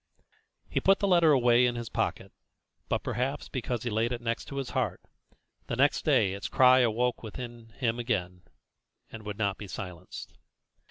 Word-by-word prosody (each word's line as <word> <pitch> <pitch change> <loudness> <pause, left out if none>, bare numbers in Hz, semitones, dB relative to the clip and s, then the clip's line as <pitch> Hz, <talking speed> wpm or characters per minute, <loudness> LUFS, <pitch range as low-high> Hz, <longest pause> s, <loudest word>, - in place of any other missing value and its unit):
He - - 0
put 195 0 +4
the 200 - 0
letter 170 -4 +5
away 125 -2 +5
in 120 - -1
his 120 -1 -4
pocket, - - -2 0.6
but, - - 0
perhaps 135 +5 -2
because 120 -2 -3
he 120 - -2
laid 115 +3 +1
it 120 - -2
next 115 -1 -3
his 135 -2 -4
heart, 115 -9 -1 0.7
the - - -2
next - - +2
day 95 - +3
its 100 0 -4
cry 130 0 +6
awoke 120 0 +1
within 120 0 -8
him 120 -2 0
again, 90 -7 -2 0.7
and 115 - -8
would 105 -1 -6
not 100 -2 -1
be 105 - -7
silenced. 90 -3 -8
120 Hz, 170 wpm, -29 LUFS, 110-125 Hz, 0.7 s, cry